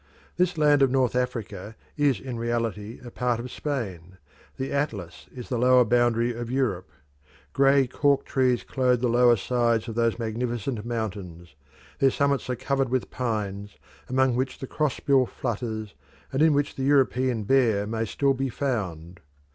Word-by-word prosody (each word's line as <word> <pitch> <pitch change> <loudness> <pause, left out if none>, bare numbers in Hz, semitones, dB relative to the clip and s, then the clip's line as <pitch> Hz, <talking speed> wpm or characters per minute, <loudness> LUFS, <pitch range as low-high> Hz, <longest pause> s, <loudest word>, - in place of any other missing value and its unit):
This 180 -1 +1
land 150 -2 +4
of 135 - +5
North 130 -2 +1
Africa 115 -5 -3 0.2
is 145 -4 +2
in 125 -3 -6
reality 115 -2 -3
a 120 - -8
part 120 -1 -1
of 125 +1 -6
Spain; 95 - -5 0.4
the 135 - -3
Atlas 110 - -3
is 125 -2 -9
the 125 - -1
southern 125 -2 +5
boundary 120 0 +2
of 120 0 -6
Europe. 120 - -1 0.6
Grey 135 0 +4
cork 140 +2 +1
trees 125 -5 +1
clothe 125 +3 +1
the 125 - +2
lower 120 0 +5
sides 115 +1 0
of 115 - -4
those 115 0 +1
magnificent 115 0 -3
mountains; 100 -8 -5 0.5
their 135 - +5
summits 140 0 0
are 125 - 0
covered 135 +1 -1
with 130 0 -1
pines, 105 -5 -3 0.3
among 130 -1 +2
which 130 +1 -2
the - - -6
cross 150 0 -1
bill 135 -3 +3
flutters, 110 -3 -4 0.4
and 135 - 0
in 155 -2 +5
which 145 0 0
the 135 - -2
European 130 -4 +2
bear 110 -3 +2
may 110 +1 -2
still 140 +5 +1
be 135 0 -2
found. 90 - -3
120 Hz, 165 wpm, -25 LUFS, 110-135 Hz, 0.6 s, of